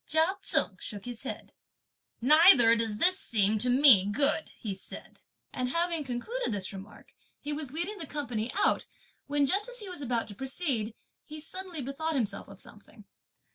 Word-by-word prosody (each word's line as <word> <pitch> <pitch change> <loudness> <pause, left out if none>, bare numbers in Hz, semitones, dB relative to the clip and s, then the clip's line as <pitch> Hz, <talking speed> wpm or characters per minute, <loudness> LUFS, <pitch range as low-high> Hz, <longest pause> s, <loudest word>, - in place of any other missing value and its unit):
Chia 320 +5 +2
Cheng 190 - +2
shook 205 -2 -8
his 245 -2 -7
head. 270 - -7 0.7
"Neither 270 -4 +7
does 225 -2 -2
this 370 - +4
seem 215 - 0
to 250 - 0
me 245 -7 +7
good!" 285 +9 +1
he 210 -5 -4
said; 190 - -12 0.3
and 250 0 -2
having 335 +1 0
concluded 285 - -4
this 200 -2 -4
remark 195 +2 -12 0.3
he 295 +1 -4
was 295 -2 -5
leading 345 +9 -4
the 320 - -5
company 245 -6 -4
out, 405 - +1 0.4
when 290 0 +2
just 400 - 0
as - - -3
he 420 -5 -5
was 360 -5 -8
about 240 -4 -1
to - - -8
proceed, 260 - -2 0.3
he 310 0 -10
suddenly 350 -1 -6
bethought 310 +5 -3
himself 235 -7 -2
of 195 -1 -13
something. 210 +1 -14
270 Hz, 175 wpm, -29 LUFS, 220-320 Hz, 0.7 s, Neither